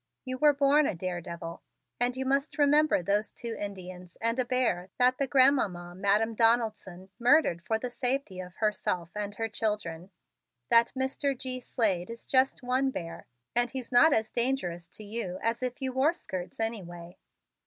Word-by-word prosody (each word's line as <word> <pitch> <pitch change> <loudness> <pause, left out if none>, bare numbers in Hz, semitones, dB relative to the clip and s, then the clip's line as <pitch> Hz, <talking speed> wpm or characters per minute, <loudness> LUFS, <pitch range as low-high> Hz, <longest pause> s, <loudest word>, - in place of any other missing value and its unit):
You 255 0 -4
were 300 0 +6
born 285 +1 +4
a - - -2
daredevil 170 -1 -5 0.4
and 245 +1 +1
you 265 - -2
must 275 +4 0
remember 295 -6 +4
those 205 +3 0
two 235 -2 -5
Indians 185 -3 -7
and 230 +2 0
a 255 - +2
bear 240 -8 0
that 250 +1 +4
the 275 - +1
Grandmamma 245 -10 +2
Madam 205 +4 +1
Donaldson 220 -5 0
murdered 240 - +3
for 220 - 0
safety 245 -5 -2
for 180 -1 -6
herself 185 -5 -1
and 205 0 -4
her 225 +1 -2
children. 205 -6 -3 0.6
That 230 0 +5
Mr. 265 +1 -1
G. 255 0 -4
Slade 205 -7 -1
is 230 0 -9
just 260 0 +2
one 255 +2 +1
bear 165 -8 -7 0.3
and 240 0 +2
he's 255 0 -7
not 250 +6 +6
as 220 -5 +1
dangerous 210 -9 -1
to 215 - -10
you 205 -4 -4
as 230 +1 0
if 250 +1 -3
you 260 -1 -2
wore 280 +6 +2
'skirts' 185 - -6
anyway. 180 -6 -4
230 Hz, 165 wpm, -29 LUFS, 185-260 Hz, 0.6 s, were